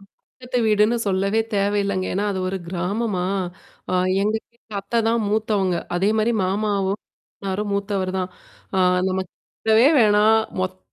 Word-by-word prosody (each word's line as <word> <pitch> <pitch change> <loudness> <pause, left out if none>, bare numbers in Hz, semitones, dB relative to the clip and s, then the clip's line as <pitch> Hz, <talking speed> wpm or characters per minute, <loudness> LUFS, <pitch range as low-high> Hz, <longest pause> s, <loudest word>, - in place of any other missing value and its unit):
பக்கத்து 250 +5 -7
வீடுன்னு 215 +2 +3
சொல்லவே 195 +3 +1
தேவயில்லைங்க. 200 -1 0
ஏன்னா 200 +2 0
அது 190 - -3
ஒரு 190 - -2
கிராமமா, 185 +2 -1 0.7
அ - - -2 0.3
எங்க 210 +2 +1 0.2
வீட்டு 225 -3 -11
அத்தை 230 +4 -1
தான் 230 +1 +2
மூத்தவங்க. 210 -4 +1 0.2
அதே 195 +4 +2
மாரி 220 +2 +2
மாமாவும். 200 0 0 0.5
மாமன்னாரும் 200 +2 -2
மூத்தவர் 200 -2 -1
தான். 185 0 -2 0.5
ஆ - - +3 0.3
நம்ம 190 0 -1
கேட்கவே 220 +3 +1
வேணாம். 210 0 +5 0.3
மொத்த 185 0 -3
200 Hz, 135 wpm, -22 LUFS, 190-215 Hz, 0.7 s, வேணாம்